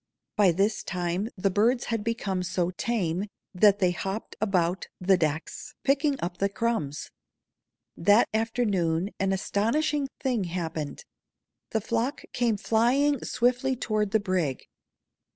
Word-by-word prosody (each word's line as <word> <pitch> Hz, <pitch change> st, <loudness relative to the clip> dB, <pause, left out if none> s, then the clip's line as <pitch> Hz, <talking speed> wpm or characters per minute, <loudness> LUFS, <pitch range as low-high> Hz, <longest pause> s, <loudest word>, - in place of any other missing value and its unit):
By 205 Hz, -4 st, +5 dB
this 200 Hz, +5 st, +1 dB
time 180 Hz, +3 st, -2 dB
the 195 Hz, +1 st, +1 dB
birds 230 Hz, +6 st, +2 dB
had 225 Hz, -2 st, -1 dB
become 210 Hz, -5 st, -1 dB
so 180 Hz, 0 st, -1 dB
tame 190 Hz, -3 st, -1 dB, 0.3 s
that 200 Hz, +2 st, +5 dB
they 185 Hz, -3 st, +2 dB
hopped 195 Hz, +4 st, -4 dB
about 185 Hz, -3 st, +1 dB
the 190 Hz, +1 st, +4 dB
decks, 155 Hz, -2 st, -3 dB
picking 280 Hz, 0 st, +2 dB
up 175 Hz, +1 st, -3 dB
the 200 Hz, -, +2 dB
crumbs. 200 Hz, -9 st, -2 dB, 0.8 s
That 205 Hz, +6 st, +4 dB
afternoon 205 Hz, -6 st, 0 dB
an 195 Hz, 0 st, +1 dB
astonishing 270 Hz, +10 st, 0 dB
thing 245 Hz, -7 st, 0 dB
happened. 165 Hz, -, -4 dB, 0.6 s
The 220 Hz, -, 0 dB
flock 230 Hz, +6 st, -1 dB
came 235 Hz, -3 st, +1 dB
flying 250 Hz, +7 st, +2 dB
swiftly 250 Hz, +2 st, +1 dB
toward 215 Hz, -4 st, -1 dB
the 220 Hz, -, +3 dB
brig. 185 Hz, -9 st, -1 dB
205 Hz, 130 wpm, -27 LUFS, 180-230 Hz, 0.8 s, By